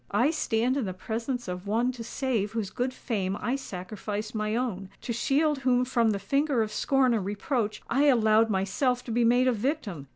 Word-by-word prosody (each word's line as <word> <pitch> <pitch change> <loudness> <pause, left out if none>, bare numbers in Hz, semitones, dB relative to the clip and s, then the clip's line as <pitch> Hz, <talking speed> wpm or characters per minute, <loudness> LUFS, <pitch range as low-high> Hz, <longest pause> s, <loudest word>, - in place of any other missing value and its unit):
"I 245 +9 +3
stand 250 -4 0
in 265 - -1
the 185 -2 -4
presence 235 +5 -3
of 180 +2 -5
one 235 +4 +1
to 245 -2 -8
save 230 -4 -2
whose 215 -4 -2
good 250 +5 -1
fame 200 -7 -2
I 245 - -1
sacrificed 210 -1 -5
my 215 0 -1
own—to 230 -1 -3
shield 290 +5 +1
whom 250 -1 +2
from 235 -3 +2
the 205 - +1
finger 275 +3 +1
of 215 - -5
scorn 265 0 +2
and 220 -4 0
reproach, 210 +2 -2
I 275 +5 +2
allowed 225 -4 +4
myself 220 +6 0
to 235 - -6
be 235 +1 +2
made 245 +2 +4
a - - +5
victim! 215 - -3
230 Hz, 195 wpm, -27 LUFS, 210-255 Hz, -, a